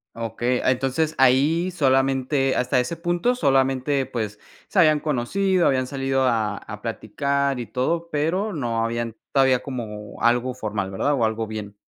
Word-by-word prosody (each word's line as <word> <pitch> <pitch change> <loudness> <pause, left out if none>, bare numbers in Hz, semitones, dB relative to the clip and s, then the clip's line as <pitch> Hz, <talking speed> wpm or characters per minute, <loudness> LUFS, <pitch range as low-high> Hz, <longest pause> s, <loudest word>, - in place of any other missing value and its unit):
Okey, 120 +2 -1
ah, - - +4
entonces 135 +5 0
ahí 145 +7 +4
solamente 135 -3 +1
hasta 125 0 +1
ese 125 +7 -2
punto 175 +8 0
solamente, 135 - +1
pues 110 -5 -4 0.3
se 195 - 0
habían 155 -3 +5
conocido, 175 +7 +1
habían 130 -2 +1
salido 135 0 -1
a 110 -4 0
a 105 0 -9
platicar 140 +4 -1
y 120 - -5
todo, 165 +7 -1
pero 170 +8 0
no 120 - -1
habían 115 0 -3 0.2
todavía 130 -2 +4
como 105 -6 -7
algo 125 +1 +2
formal, 105 -5 -3
¿verdad? 100 +10 0
O 125 -5 +2
algo 110 0 -1
bien. 105 -2 -7
130 Hz, 155 wpm, -23 LUFS, 115-145 Hz, 0.3 s, habían